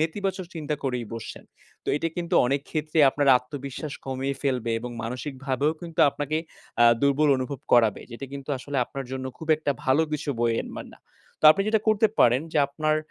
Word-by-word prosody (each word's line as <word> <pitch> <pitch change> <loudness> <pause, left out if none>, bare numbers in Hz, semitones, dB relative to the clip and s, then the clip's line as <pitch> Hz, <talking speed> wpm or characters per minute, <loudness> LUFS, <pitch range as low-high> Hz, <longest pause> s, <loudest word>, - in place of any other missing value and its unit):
নেতিবাচক 185 +3 -2
চিন্তা 155 -2 -2
করেই 125 -3 -1
বসছেন। 115 - -8 0.4
তো - - -7
এটা 165 +3 -1
কিন্তু 170 -1 -2
অনেক 135 +3 +1
ক্ষেত্রে 155 0 -2
আপনার 145 +1 0
আত্মবিশ্বাস 140 +3 -7
কমিয়ে 135 +1 -2
ফেলবে 125 -4 0
এবং 125 +1 -6
মানসিকভাবেও 135 +4 -2
কিন্তু 170 -3 -4
আপনাকে 145 +2 -3 0.5
আ - - +8 0.2
দুর্বল 140 +2 +3
অনুভব 130 +1 -4
করাবে। 115 -4 +4
যেটা 120 +4 -7
কিন্তু 140 0 -8
আসলে 140 +2 -5
আপনার 135 +1 -7
জন্য 130 0 -4
খুব 160 - -9
একটা 150 -2 -1
ভালো 130 +4 +3
কিছু 150 0 -2
বয়ে 115 -1 +2
আনবে - - -8
না। - - -16 0.4
তো - - -5
আপনি 195 +6 +3
যেটা 220 0 +2
করতে 215 +1 +4
পারেন 120 +2 +5
যে, - - +2
আপনার 155 +2 0
140 Hz, 185 wpm, -25 LUFS, 130-155 Hz, 0.5 s, আ